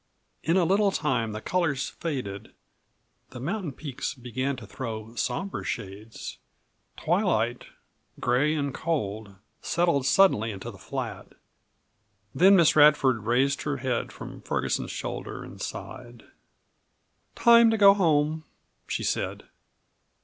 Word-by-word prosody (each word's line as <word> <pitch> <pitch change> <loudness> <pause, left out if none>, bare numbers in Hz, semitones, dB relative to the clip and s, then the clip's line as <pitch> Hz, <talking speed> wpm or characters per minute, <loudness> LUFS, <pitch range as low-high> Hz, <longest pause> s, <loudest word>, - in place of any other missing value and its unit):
In 165 +5 +1
a 185 - +4
little 200 +4 +3
time 130 - -1
the 105 - -5
colors 160 -6 0
faded, 125 -12 -5 0.7
the 125 - -9
mountain 170 - -3
peaks 140 -1 -5
began 130 +2 -3
to 120 -4 -10
throw 110 0 -6
sombre 195 +10 -3
shades; 100 +3 -6 0.6
twilight 155 - 0 0.5
gray 135 +6 +2
and 140 -3 -2
cold 110 -11 -3 0.3
settled 165 -5 +1
suddenly 135 - +4
into 100 -3 -6
the - - -15
flat. - - -6 1.0
Then 190 +3 +6
Miss 170 -4 +5
Radford 140 -7 +5
raised 135 +4 +2
her 145 -2 -2
head 130 -2 -2
from - - -10
Ferguson's - - -2
shoulder - - -5
and - - -11
sighed. 120 -2 -8 1.1
"Time 235 -1 +6
to 225 - +1
go 200 -1 +8
home," 155 -4 +1 0.4
she - - -2
said. - - -2
140 Hz, 120 wpm, -26 LUFS, 120-170 Hz, 1.1 s, go